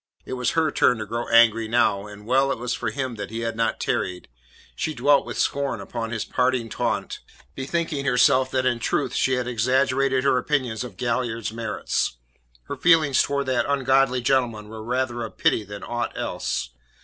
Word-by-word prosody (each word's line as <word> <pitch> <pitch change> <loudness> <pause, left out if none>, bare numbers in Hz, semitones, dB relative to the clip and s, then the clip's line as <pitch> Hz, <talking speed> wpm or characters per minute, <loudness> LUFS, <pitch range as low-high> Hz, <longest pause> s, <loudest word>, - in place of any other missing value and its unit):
It - - -6
was 125 -1 -1
her 160 -2 +3
turn 125 - +3
to 110 - -4
grow 115 +3 -4
angry 115 -1 +5
now, 105 -3 +1
and 105 0 -12
well 135 +3 +2
it - - -2
was 120 +1 -3
for 120 - -2
him 130 -1 -4
that 105 -1 -5
he 115 +1 -5
had 115 -1 -2
not 115 0 0
tarried. 90 -6 -2 0.5
She 155 - -3
dwelt 145 -1 +3
with - - -5
scorn 140 -1 0
upon 115 -2 -5
his 110 -1 -3
parting 125 -2 0
taunt, - - -2 0.3
bethinking 145 +1 -2
herself 130 0 +4
that 130 -1 0
in 120 -2 +1
truth 115 - -1
she 130 - +1
had 125 -1 -1
exaggerated 130 +2 +1
her 135 -2 +3
opinions 125 -7 -1
of 110 -7 -9
Galliard's 115 -2 -2
merits. 110 - -2 0.5
Her - - -6
feelings 160 -6 +4
towards 140 0 -1
that 125 -2 0
ungodly 135 -2 +2
gentleman 120 -4 0
were 110 0 -8
rather 120 0 -1
of 115 - -7
pity 110 - +2
than 100 0 -9
aught 120 0 -3
else. 60 - -3
125 Hz, 185 wpm, -24 LUFS, 115-130 Hz, 0.5 s, angry